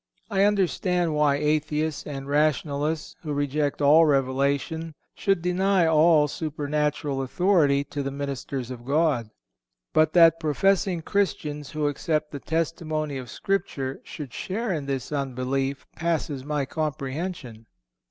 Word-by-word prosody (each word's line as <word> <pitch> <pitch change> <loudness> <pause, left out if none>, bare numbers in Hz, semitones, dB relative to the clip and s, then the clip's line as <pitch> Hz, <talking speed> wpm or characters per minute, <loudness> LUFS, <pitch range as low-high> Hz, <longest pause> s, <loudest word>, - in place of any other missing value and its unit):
I 195 0 +4
understand 180 -4 +1
why 150 -2 +3
atheists 150 +1 -1
and 135 -2 -6
rationalists, 150 +1 0
who 150 -3 -4
reject 145 0 -1
all 155 +3 +7
revelation, 140 +3 0 0.2
should 195 -4 0
deny 185 0 +2
all 160 -1 +5
supernatural 150 -2 -2
authority 145 -1 +2
to 145 0 -5
the 135 - -2
ministers 140 -2 -4
of 120 -2 -8
God. 140 -4 +1 0.6
But 155 0 +3
that 165 -2 +6
professing 175 +3 +1
Christians 150 -8 -1
who 155 -1 -2
accept 150 +1 -1
the 145 - -5
testimony 155 -2 -2
of 125 -2 -7
Scripture 160 -9 -2
should 140 -6 -8
share 215 +2 -2
in 145 -4 -4
this 135 -1 -3
unbelief 135 0 -2
passes 160 -5 -2
my 145 -1 -1
comprehension. 140 -4 -4
150 Hz, 125 wpm, -25 LUFS, 140-165 Hz, 0.6 s, all